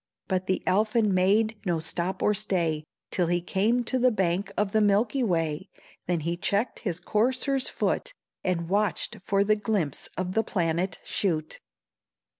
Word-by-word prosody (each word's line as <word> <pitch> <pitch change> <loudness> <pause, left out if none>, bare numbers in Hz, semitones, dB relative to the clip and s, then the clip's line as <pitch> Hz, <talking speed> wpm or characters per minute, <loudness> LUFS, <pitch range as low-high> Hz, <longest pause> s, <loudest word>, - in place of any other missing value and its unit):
But 185 -1 -1
the 185 - 0
Elfin 215 +1 +2
made 210 +4 +3
no 175 -5 0
stop 170 +3 -3
or 210 - +4
stay 170 -7 -1 0.3
Till 175 -2 +1
he 175 +1 +2
came 210 +7 +1
to 255 +2 0
the 255 +1 +5
bank 195 -2 0
of 205 -1 +1
the 220 - +3
milky 210 +6 +2
way, 165 -4 0 0.4
Then 175 -2 0
he 170 +3 -2
checked 200 +6 0
his 180 -6 -3
courser's 255 +7 +1
foot, - - -1 0.3
And 170 -2 -1
watched 200 +1 0
for 200 0 +3
the 215 +1 +3
glimpse 210 - -2
of 185 0 -2
the 220 +2 +2
planet 175 -2 -1
shoot. 160 -6 -1
195 Hz, 160 wpm, -27 LUFS, 175-215 Hz, 0.4 s, the